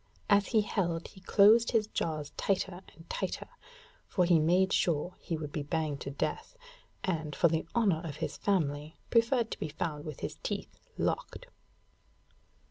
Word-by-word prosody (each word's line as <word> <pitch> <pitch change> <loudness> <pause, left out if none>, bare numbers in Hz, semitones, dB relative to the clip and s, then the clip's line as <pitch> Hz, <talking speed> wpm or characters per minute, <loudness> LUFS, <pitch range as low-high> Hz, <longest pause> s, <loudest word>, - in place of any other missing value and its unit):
As 200 -1 +5
he 220 - +3
held 175 -5 -1
he 190 - -16
closed 215 +5 +5
his 220 -2 +3
jaws 155 -7 -3
tighter 190 -2 -1
and 165 +1 -16
tighter, - - -3 0.6
for 180 - +2
he 170 -2 +5
made 180 +5 +3
sure 170 +1 +1
he 165 - -3
would 150 -2 -5
be 150 - -2
banged 150 -1 -2
to - - -4
death, 450 - -3 0.5
and, 160 -5 -2
for 170 - +4
the 160 +1 -1
honour 200 -9 +3
of 155 -4 -5
his - - -4
family, 155 -5 0 0.2
preferred 230 0 +3
to - - -5
be 155 - -3
found 150 -1 -3
with 155 - -7
his - - -4
teeth - - -5
locked. - - -2
170 Hz, 165 wpm, -31 LUFS, 155-200 Hz, 0.6 s, As